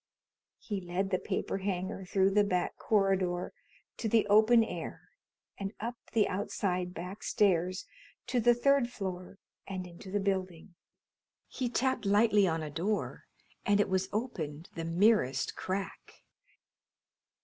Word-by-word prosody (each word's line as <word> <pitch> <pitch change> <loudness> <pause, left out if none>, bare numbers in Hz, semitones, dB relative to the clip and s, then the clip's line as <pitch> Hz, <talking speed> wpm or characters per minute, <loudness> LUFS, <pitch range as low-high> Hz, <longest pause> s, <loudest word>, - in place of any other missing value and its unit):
He 205 -3 -4
led 185 +2 -2
the 185 - +2
paper 195 - -2
hanger 190 0 -3
through 195 +1 +2
the 205 +1 +4
back 180 -3 0
corridor 190 -4 +1 0.4
to 225 - -2
the 225 0 +4
open 220 +3 +6
air - - -6 0.5
and 195 +1 -4
up 235 +3 -3 0.2
the 220 -3 +4
outside 185 -2 -2
back 180 +4 -6
stairs 185 -3 +1 0.4
to 250 - 0
the 240 +1 +5
third 275 0 +3
floor 190 -4 -6 0.3
and 190 -2 -4
into 175 +2 -11
the 205 +2 0
building. 190 -3 -2 0.7
He 255 -2 -3
tapped 255 -2 0
lightly 205 -1 +4
on 165 -2 -1
a 150 - -5
door 195 +8 -2 0.4
and 205 0 +3
it 205 - +2
was 190 0 0
opened 170 - -4
the 165 - -4
merest 165 - +2
crack. 195 +1 -5
195 Hz, 140 wpm, -31 LUFS, 180-210 Hz, 0.7 s, open